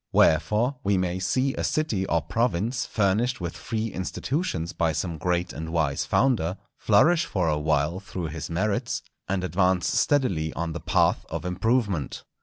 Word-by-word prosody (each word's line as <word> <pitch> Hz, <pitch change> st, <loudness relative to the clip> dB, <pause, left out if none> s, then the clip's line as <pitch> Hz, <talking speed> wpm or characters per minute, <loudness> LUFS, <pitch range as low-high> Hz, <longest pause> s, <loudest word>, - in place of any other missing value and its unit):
Wherefore, 110 Hz, -, +3 dB
we 100 Hz, 0 st, +2 dB
may 90 Hz, 0 st, -1 dB
see 130 Hz, +9 st, +1 dB
a -, -, -3 dB
city 110 Hz, -12 st, 0 dB
or 85 Hz, -2 st, +1 dB
province 115 Hz, -, 0 dB
furnished 110 Hz, +5 st, +1 dB
with 85 Hz, -2 st, -4 dB
free 110 Hz, 0 st, -3 dB
institutions 95 Hz, -, -2 dB
by 80 Hz, -4 st, +1 dB
some 80 Hz, 0 st, -3 dB
great 90 Hz, +1 st, 0 dB
and 80 Hz, 0 st, -5 dB
wise 80 Hz, -4 st, 0 dB
founder, 100 Hz, -9 st, +1 dB, 0.2 s
flourish 160 Hz, +11 st, +4 dB
for 90 Hz, -4 st, -1 dB
a 75 Hz, -1 st, +1 dB
while 75 Hz, +3 st, +1 dB
through 90 Hz, -4 st, -5 dB
his 80 Hz, +1 st, -6 dB
merits, 100 Hz, +5 st, -1 dB, 0.3 s
and 95 Hz, -1 st, 0 dB
advance 90 Hz, -1 st, +2 dB
steadily 95 Hz, -, +1 dB
on 85 Hz, -1 st, -3 dB
the 85 Hz, -, -4 dB
path -, -, +2 dB
of 80 Hz, +1 st, -4 dB
improvement. 100 Hz, -, 0 dB
95 Hz, 160 wpm, -26 LUFS, 85-110 Hz, 0.3 s, flourish